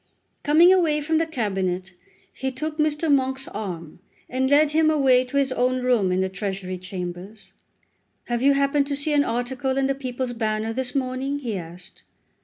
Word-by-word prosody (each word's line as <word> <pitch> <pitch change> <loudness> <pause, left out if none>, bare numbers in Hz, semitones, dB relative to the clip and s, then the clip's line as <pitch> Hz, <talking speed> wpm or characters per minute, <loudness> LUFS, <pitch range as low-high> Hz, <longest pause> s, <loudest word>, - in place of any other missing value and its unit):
Coming 330 +5 +6
away 325 -5 +2
from 315 +2 0
the 325 - 0
Cabinet 190 - -2 0.4
he 265 0 -3
took 305 +4 -5
Mr. 305 +1 +1
Monk's 265 0 0
arm, 175 -7 -6 0.3
and 260 +1 0
led 290 +1 +4
him 310 0 +3
away 265 -5 +4
to 255 +3 -3
his 275 -1 +2
own 255 0 0
room 235 -7 +2
in 185 +1 +1
the 190 - +1
Treasury 190 -1 -5
Chambers. 185 +2 -7 0.7
"Have 240 -1 -2
you 280 +1 +5
happened 280 0 +1
to 285 - -1
see 290 +2 -1
an 290 -1 +4
article 260 +2 -2
in 270 - +2
the 275 - +1
'People's 255 -2 -4
Banner' 220 -1 -2
this 260 +2 -3
morning?" 265 +1 -1
he 240 -7 -4
asked. 175 0 -9
255 Hz, 180 wpm, -24 LUFS, 205-285 Hz, 0.7 s, Coming